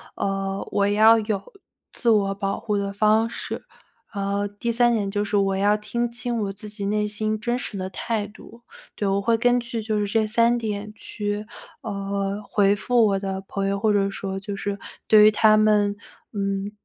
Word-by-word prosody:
呃， 195 0 -2
我 200 0 +2
要 220 +2 +6
有 210 -2 -2 0.5
自 235 - -1
我 200 -3 +3
保 195 -1 -2
护 210 -2 -1
的 200 0 -2
方 215 +2 +3
式。 - - -5 0.5
然 200 - -2
后 200 0 0
第 205 +3 -3
3 240 0 +3
点 205 -3 0
就 205 +1 -1
是 210 - -2
我 195 -1 +1
要 205 +1 +3
听 235 +3 -2
清 240 0 -3
我 195 -1 -3
自 210 +2 -8
己 205 -1 -6
内 210 +1 0
心 215 +1 -2
真 240 +2 -1
实 205 - -5
的 185 - -3
态 210 +2 -3
度。 230 +3 -15 0.3
对， 205 - -2
我 195 +1 +1
会 230 +2 +2
根 245 +1 +3
据 235 -1 -4
就 215 -1 -1
是 205 - 0
这 215 +1 +1
3 235 +2 +3
点 210 -2 -4
去， 210 -1 -4 0.4
呃， 200 0 -3
回 200 -1 +3
复 230 +1 +3
我 195 -1 +1
的 190 -1 -4
朋 195 -1 -2
友 200 0 -1
或 215 +1 +2
者 200 -1 +2
说 195 -1 -4
就 200 +1 -6
是 200 0 -3 0.3
对 215 -1 +7
于 215 - +8
他 215 0 +5
们， 210 -1 +3 0.3
嗯， 200 0 -2
205 Hz, 205 characters per minute, -24 LUFS, 200-220 Hz, 0.5 s, 于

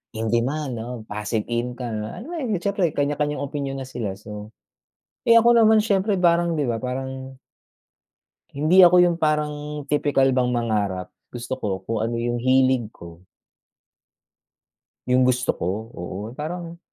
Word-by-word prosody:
in 110 0 -2
demand, 130 +3 0
oh, 125 +2 -6
passive 105 +1 -3
income." 120 -2 -3
Alam 225 - -8
mo - - -5
'yun, 250 -6 -2
at 175 - -4
siyempre 200 -1 0
may - - -19
kanya-kanyang 145 0 -1
opinyon 140 -1 -4
na 130 - -6
sila. 115 -6 -4
So, 105 +1 -9 0.8
eh 230 - +7
ako 235 +1 +6
naman, 220 0 +6
siyempre 200 -1 +1
parang 170 -1 +3
di 150 - 0
ba, 115 -1 -1
parang 130 +1 -5 1.2
hindi 165 +6 +6
ako 180 +1 +6
'yung 175 -1 +4
parang 150 -2 -1
tipikal 145 -2 +2
bang 125 -1 +1
mangarap, 105 -6 -1 0.2
gusto 120 +2 -4
ko 100 -6 -3
kung 110 -1 -1
ano 115 0 -2
'yung 120 0 -1
hilig 130 -2 +2
ko. 85 +1 -13 1.8
'Yung 125 0 +3
gusto 125 0 +1
ko, - - -3 0.3
oo. 95 +2 -6 0.2
Parang 170 +2 -5
130 Hz, 150 wpm, -23 LUFS, 115-155 Hz, 1.8 s, eh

